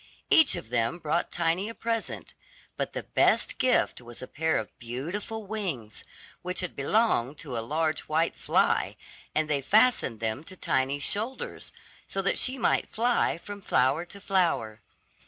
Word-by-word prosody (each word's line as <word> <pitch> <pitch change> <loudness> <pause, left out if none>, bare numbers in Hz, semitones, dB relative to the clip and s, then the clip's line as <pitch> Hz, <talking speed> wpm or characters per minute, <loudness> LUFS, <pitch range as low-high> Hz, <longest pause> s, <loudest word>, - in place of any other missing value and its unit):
Each 320 -4 +7
of 110 - -7
them 120 +6 +1
brought 170 +1 -1
Tiny 175 +4 0
a 230 - -8
present; 230 -1 -3 0.4
but - - -3
the - - -4
best - - +2
gift 255 - +2
was 120 -1 -11
a - - -6
pair 160 +1 0
of 110 - -5
beautiful 175 - -5
wings, 180 - -4 0.4
which 180 +1 -2
had 180 - -4
belonged 145 - +1
to 135 -5 -6
a 115 - -1
large 155 +6 0
white 160 +2 +1
fly - - +1 0.4
and 155 0 +2
they 145 -2 0
fastened 210 - +3
them 110 +5 -2
to 185 - -10
Tiny's 140 -3 0
shoulders, 225 +6 -2 0.4
so 195 - -3
that 195 - +1
she 260 +1 +1
might 255 - +1
fly 240 -3 +1
from 205 +4 -9
flower 135 0 +2
to 200 +3 -11
flower. 170 - 0
165 Hz, 160 wpm, -28 LUFS, 130-205 Hz, 0.4 s, Each